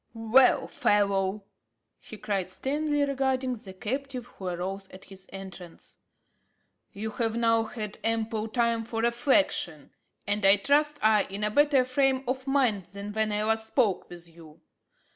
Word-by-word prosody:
"Well, 230 +3 +4
fellow," 200 -1 +1 0.6
he 215 - -11
cried, 195 -3 -2
sternly 290 +7 -1
regarding 265 -2 0
the 210 -5 -9
captive, 255 +5 -4
who 190 -5 -9
arose 190 +2 -4
at 190 - -12
his 190 -1 -12
entrance, 190 -3 -10 0.9
"you 220 +2 -5
have 225 0 -1
now 230 -1 +2
had 215 -2 -6
ample 225 -1 -1
time 235 0 0
for 225 0 -4
reflection, 235 - +1 0.3
and 205 +1 -1
I 195 +1 +7
trust 295 +5 +1
are 215 -1 +5
in 200 +2 -5
a 210 - 0
better 285 +1 +4
frame 265 +1 +1
of 260 +1 -3
mind 250 -9 +1
than 200 +3 -8
when 220 0 0
I 210 0 0
last 220 0 0
spoke 205 -4 0
with 175 -1 -9
you. 165 -2 -16
220 Hz, 150 wpm, -27 LUFS, 195-255 Hz, 0.9 s, I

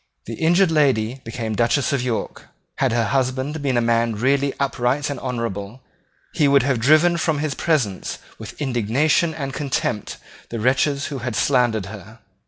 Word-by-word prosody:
The 115 - -6
injured 170 - +3
lady 130 -5 +1
became 115 -1 -4
Duchess 120 +6 +1
of 140 - +1
York. 125 -3 -4 0.3
Had 135 -3 +1
her 120 0 +1
husband 135 +4 -1
been 135 -3 0
a - - +3
man 115 -1 +1
really 140 +5 +1
upright 135 +1 0
and 145 - -5
honourable, 115 -2 -4 0.5
he 150 - +3
would 140 0 +4
have 135 -3 +1
driven 155 +7 +4
from 160 -2 0
his 150 -1 -1
presence 135 - -1 0.2
with 110 -1 -9
indignation 140 +5 +1
and 135 -3 -4
contempt 130 -7 -2 0.3
the 115 - -4
wretches 140 +4 +1
who 135 - -4
had 120 -2 -4
slandered 120 -7 +2
her. 110 +3 -11
130 Hz, 165 wpm, -21 LUFS, 115-145 Hz, 0.5 s, would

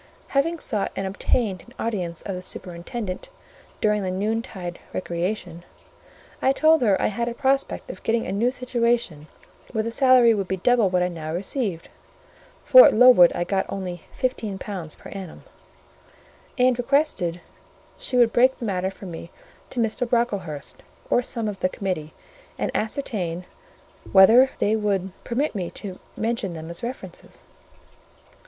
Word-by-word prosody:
Having 320 +5 +1
sought 210 -5 -1
and 195 - -2
obtained 195 0 0
an 240 - -18
audience 180 -7 -3
of 195 - -4
the 180 - -5
superintendent 185 - -6 0.5
during 210 -1 +2
the 190 - -2
noontide 195 -2 -3
recreation, 175 -1 -3 0.8
I 265 - +3
told 315 +1 +4
her 205 -5 +3
I - - +1
had 235 +3 -1
a 235 - -3
prospect 270 +1 0
of - - -12
getting 230 0 0
a - - -4
new 215 +5 +2
situation 235 - -1 0.5
where 220 -2 0
the 230 - -3
salary 255 -2 +5
would 200 -3 -2
be 190 - -2
double 230 +1 +3
what 180 -1 +2
I - - +1
now 160 -3 -6
received 190 - -3 0.8
(for - - +9
at - - +2
Lowood 235 -7 +8
I 175 - -1 0.2
only 180 -3 -5 0.2
got 255 -1 0
£15 190 -6 -6
per - - -12
annum); 190 -4 -8 1.1
and 250 -1 +3
requested 245 - +1 0.6
she 250 - -3
would 235 -2 +5
break 255 +2 +4
the 235 - -5
matter 190 -2 -1
for 195 - -11
me 170 -1 -8 0.4
to 250 - -5
Mr. 230 +2 0
Brocklehurst, 200 - -2 0.3
or 245 - +4
some 230 -2 -4
of 205 -2 -4
the 185 - +1
committee, 180 -6 -4 0.4
and - - -2
ascertain 200 -7 -2 0.7
whether 225 +7 +7
they 210 +2 +2
would 200 -3 -1
permit 270 +6 -1
me 185 -5 -3
to 190 -3 -8 0.2
mention 220 -4 -2
them 160 0 -7
as 170 - -6
references. 245 +2 -8
210 Hz, 155 wpm, -24 LUFS, 180-240 Hz, 1.1 s, for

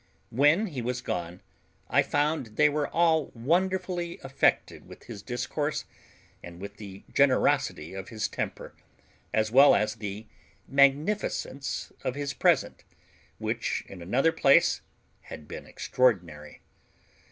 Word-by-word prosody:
When 145 - +4
he 145 - -5
was 125 +1 -2
gone 85 -5 -5 0.5
I - - +4
found 145 -7 -1
they 150 0 +5
were 145 0 -1
all 160 -2 +2
wonderfully 175 +5 -1
affected 135 0 0
with - - -13
his 110 -4 -9
discourse, 135 +6 -3 0.6
and 85 0 -11
with 100 +1 -9
the 100 -2 -10
generosity 130 - +2
of 95 0 -7
his 110 -2 -2
temper, - - -5 0.6
as 110 0 0
well 135 +4 +7
as 105 +1 +1
the 105 0 -6 0.4
magnificence 140 +1 +1
of 125 - -2
his 145 0 -3
present, - - +1 0.5
which - - -2
in 95 -3 -11
another 125 - +2
place - - +4 0.5
had 75 - -9
been - - -8
extraordinary. 85 -12 -1
130 Hz, 125 wpm, -27 LUFS, 105-150 Hz, 0.6 s, well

